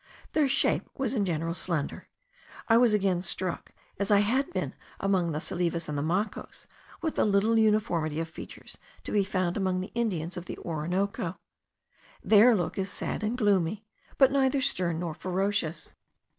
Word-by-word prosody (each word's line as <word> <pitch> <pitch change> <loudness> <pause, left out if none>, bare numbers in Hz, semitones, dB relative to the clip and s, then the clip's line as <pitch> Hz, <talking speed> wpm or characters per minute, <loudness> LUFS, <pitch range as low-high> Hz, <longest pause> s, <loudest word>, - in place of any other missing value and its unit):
Their 305 -2 +3
shape 275 +1 +1
was 270 -3 -1
in 210 -6 +1
general 165 -1 -1
slender. 170 -4 -3 0.6
I 225 - +5
was 240 -1 +5
again 190 -3 +1
struck, 185 -1 -3 0.3
as 200 - 0
I 205 -1 +6
had 260 +9 +1
been - - -3 0.3
among 185 -4 +1
the 150 - -2
Salives 170 0 -1
and 150 - -3
the 145 - -1
Macos, 185 +8 -2 0.4
with 320 - -2
the - - +4
little 210 +2 +3
uniformity 175 -8 +1
of 165 - -2
features 165 - -11 0.2
to - - -6
be 205 -1 +3
found 185 -2 -1
among 185 -2 0
the 185 - -5
Indians 185 -8 -2
of 175 - -6
the - - -6
Orinoco. 175 +3 -2 0.9
Their 220 +3 +6
look 180 0 -2
is 190 0 -1
sad - - -3
and 220 +3 -1
gloomy; 205 -2 +1 0.3
but 270 -1 +6
neither 270 0 +2
stern 180 - +1
nor 170 -1 -3
ferocious. 185 -2 -2
195 Hz, 170 wpm, -28 LUFS, 170-220 Hz, 0.9 s, I